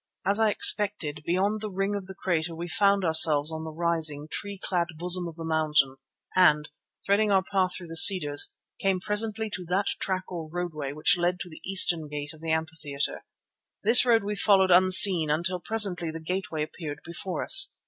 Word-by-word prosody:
As 200 +2 +2
I 220 -1 +2
expected, 205 -9 +2
beyond 200 +5 -1
the 215 - -5
ring 195 +1 -3
of 195 -2 -7
the 190 - -11
crater 170 -3 -3
we 170 +2 -7
found 200 +2 0
ourselves 160 -2 +4
on 160 0 -7
the 160 - -7
rising, 160 -2 -2
tree 200 0 -5
clad 180 -2 -3
bosom 180 +1 +1
of 165 - -10
the 165 -1 -9
mountain 150 -4 0 0.4
and, 150 -5 +2 0.4
threading 205 +1 0
our 190 -1 +2
path 185 -2 -2
through 180 - -11
the 165 - -9
cedars, 160 -5 +5 0.2
came 195 -1 -1
presently 215 +3 -2
to 185 - -6
that 190 +3 -1
track 185 -1 -3
or 165 -3 -8
roadway 160 -5 -6
which 155 +4 0
led 175 +1 -2
to 175 - -8
the 155 - -14
eastern 175 -4 +4
gate 150 0 -8
of 155 - -18
the 165 - -7
amphitheatre. 160 -3 -4 0.6
This 225 +4 +7
road 230 -3 +1
we 205 +1 -4
followed 195 -2 +2
unseen 185 -2 +5
until 170 +4 -2
presently 180 -4 +1
the 160 +1 -8
gateway 165 -2 -5
appeared 150 -2 -9
before 170 0 -6
us. - - +6
175 Hz, 190 wpm, -25 LUFS, 160-195 Hz, 0.6 s, This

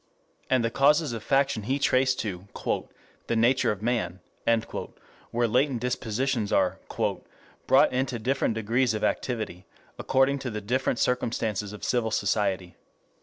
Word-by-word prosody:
And 130 -3 +3
the 115 - 0
causes 145 +2 +3
of 115 - -4
faction 135 -2 +1
he 130 +7 -1
traced 130 -2 +2
to 95 -3 -5 0.8
"the 115 - 0
nature 120 +3 +3
of 105 0 -5
man," 115 -6 -1 1.1
where 120 0 +1
latent 125 +2 +2
dispositions 125 -1 -1
are - - +2 0.9
"brought - - +5
into 130 -1 0
different 120 0 0
degrees 115 +2 +1
of 105 - -3
activity, 110 -8 -2 0.3
according 135 +1 +2
to 130 - -4
the 105 -2 -4
different 125 +4 0
circumstances 110 -5 -1
of 105 - -10
civil 120 -3 +1
society. 100 -4 0
120 Hz, 135 wpm, -27 LUFS, 105-130 Hz, 1.1 s, brought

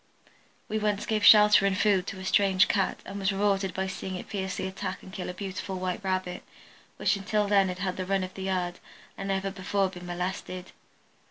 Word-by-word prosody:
We 215 - -1
once 210 -1 0
gave 215 -2 0
shelter 210 -1 +8
and 190 -1 0
food 200 -4 +2
to 195 - -5
a 190 - -7
strange 190 -1 +4
Cat 195 -2 0
and 200 - -6
was 195 0 +1
rewarded 195 -1 +1
by 190 - -1
seeing 190 0 -5
it 180 - -7
fiercely 190 -2 -3
attack 190 0 -5
and 190 - -12
kill 185 - -5
a - - -4
beautiful 190 0 -5
white 185 +2 -3
Rabbit 185 -1 -2 0.6
which 195 +1 +2
until 210 +1 0
then 200 -1 +4
had 180 0 -4
had 185 -1 -2
the 185 - -3
run 195 -1 +1
of 185 0 -6
the 190 - -8
yard 180 -2 -2 0.4
and 195 - -5
never 195 0 -1
before 195 0 0
been 180 -1 -10
molested. 180 +1 -4
190 Hz, 205 wpm, -28 LUFS, 185-200 Hz, 0.6 s, shelter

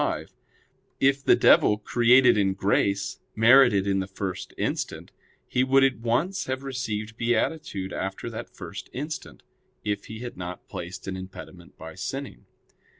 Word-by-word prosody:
5), - - -2 0.7
if 135 0 +3
the - - +6
devil, 105 - +5
created 120 +4 +5
in 95 -2 +1
grace, 100 0 0 0.2
merited 115 -3 +6
in 100 -1 +1
the 95 - -3
first 95 -1 -5
instant, - - -3 0.4
he 125 - +1
would 135 +1 +4
at 135 -3 +2
once 155 +12 0
have 130 +1 -3
received 110 -5 -4
beatitude 120 -5 -1
after 95 0 -4
that - - -6
first - - -9
instant, 150 +4 -6 0.4
if 105 -1 -2
he 110 - -8
had 120 -5 -7
not 90 0 -7
placed 90 +2 -7
an 95 - -3
impediment 95 -1 -10
by 80 0 -9
sinning. 125 - -6
110 Hz, 150 wpm, -26 LUFS, 95-130 Hz, 0.7 s, the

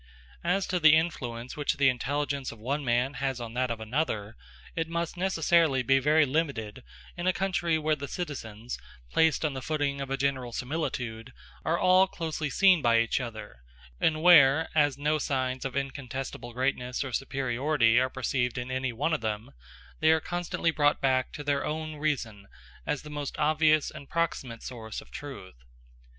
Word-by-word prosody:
As 195 0 +1
to 180 - -1
the 155 -2 +7
influence 125 -7 -2
which 150 0 -1
the 140 -1 +4
intelligence 140 +2 -1
of 115 - -11
one 140 +7 -2
man 125 +2 +1
has 135 -2 -1
on 115 -1 -6
that 125 +1 0
of 115 -1 -3
another, 110 -3 -2 0.4
it 165 -1 -1
must 170 0 -3
necessarily 170 -6 +2
be 135 +2 +4
very 150 +3 +4
limited 130 -6 -2 0.3
in 175 0 -3
a 185 - +4
country 180 -4 0
where 155 0 +1
the 140 -1 -6
citizens, 125 - -6 0.3
placed 160 -1 +3
on 150 - 0
the 130 - -5
footing 145 -1 -1
of 135 - -5
a 135 - -1
general 130 -3 -1
similitude, 125 -5 -3 0.3
are 165 +2 +1
all 185 +2 +5
closely 160 -4 -3
seen 185 +2 +5
by 115 -3 +4
each 115 +2 +2
other; 110 - -7 0.4
and 155 0 +1
where, 160 -3 +7
as 145 -3 +3
no 150 +2 +1
signs 130 -2 -1
of 130 -2 -4
incontestable 135 -2 -5
greatness 125 0 -1
or 135 -2 -6
superiority 130 -1 +2
are 130 +1 +1
perceived 125 -2 -1
in 125 +1 -4
any 130 0 -1
one 145 +8 -1
of 155 - 0
them, 110 +1 -3 0.5
they 155 - +4
are 160 0 +5
constantly 175 0 -1
brought 145 -2 +2
back 130 -2 +1
to 145 - -7
their 145 -1 0
own 155 0 -4
reason 115 -10 -2 0.4
as 150 - -1
the 150 - -9
most 145 -1 -5
obvious 155 0 +3
and 140 -2 -11
proximate 135 -8 -2
source 110 -4 -6
of - - -15
truth. 135 - -9
140 Hz, 175 wpm, -28 LUFS, 125-155 Hz, 0.5 s, the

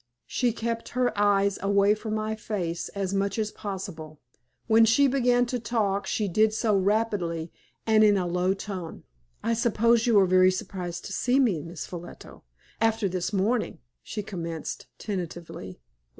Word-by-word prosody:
She 245 -2 0
kept 230 0 -3
her 250 -1 +2
eyes 200 -1 +2
away 200 +1 +4
from 215 0 -4
my 215 0 -2
face 175 -6 -3
as 195 -1 -2
much 200 +2 0
as 215 -1 -1
possible. 185 -7 -7 0.5
When 225 +1 +5
she 225 +6 +5
began 245 -2 +3
to 245 +1 -3
talk 210 -3 -1
she 210 - 0
did 215 +4 +2
so 220 -2 +2
rapidly, 190 -5 0 0.3
and 220 -1 +5
in 205 -1 +5
a 185 - 0
low 180 +2 +1
tone. 190 -4 -7 0.4
"I 230 - +1
suppose 230 0 +2
you 225 -4 +6
are 195 - +5
very 185 0 +5
surprised 180 -2 -4
to 195 - -6
see 250 +6 +2
me, 210 - +2
Miss 165 -3 -7
Ffolliot, 175 +2 -9 0.6
after 225 -2 +2
this 185 +1 -2
morning," 215 +4 0 0.2
she 210 - -5
commenced, 170 -5 -5
tentatively. 170 - -6
200 Hz, 160 wpm, -26 LUFS, 185-225 Hz, 0.6 s, you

